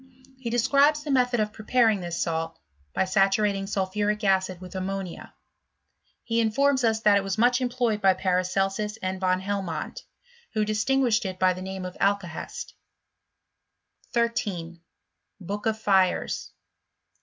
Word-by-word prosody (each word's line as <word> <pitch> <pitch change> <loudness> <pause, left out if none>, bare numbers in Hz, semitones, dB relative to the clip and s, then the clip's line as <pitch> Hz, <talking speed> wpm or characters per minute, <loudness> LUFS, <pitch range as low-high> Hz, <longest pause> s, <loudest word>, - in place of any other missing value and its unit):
He 245 -3 -4
describes 280 +6 +3
the 300 - -3
method 250 -2 +2
of 210 0 -1
preparing 220 -1 +2
this 175 -1 -4
salt, 165 0 -2 0.3
by - - +1
saturating 195 +1 +2
sulphuric 205 +2 -1
acid 190 -2 +1
with 180 -1 -10
ammonia. 190 -1 -5 0.9
He 230 0 0
in 225 - +3
i$>rms 275 +3 +2
us 220 -1 +2
that 210 -2 +5
it 200 - 0
was 195 +1 -2
much 245 +3 +3
employed 240 -4 0
by 190 -1 +5
Paraodsas 195 +3 0
and 185 0 -3
Van 185 0 +1
Helmont, 190 -5 -3 0.6
who 215 -1 +2
distingnahed 235 +2 +2
it 185 -1 -4
by 185 0 +3
the 185 - -8
name 190 0 -5
of 180 - -7
alAakesi. 195 -5 -2 1.4
13. 200 -8 -2 0.6
BookofPires. 200 -1 0
200 Hz, 130 wpm, -26 LUFS, 185-225 Hz, 1.4 s, that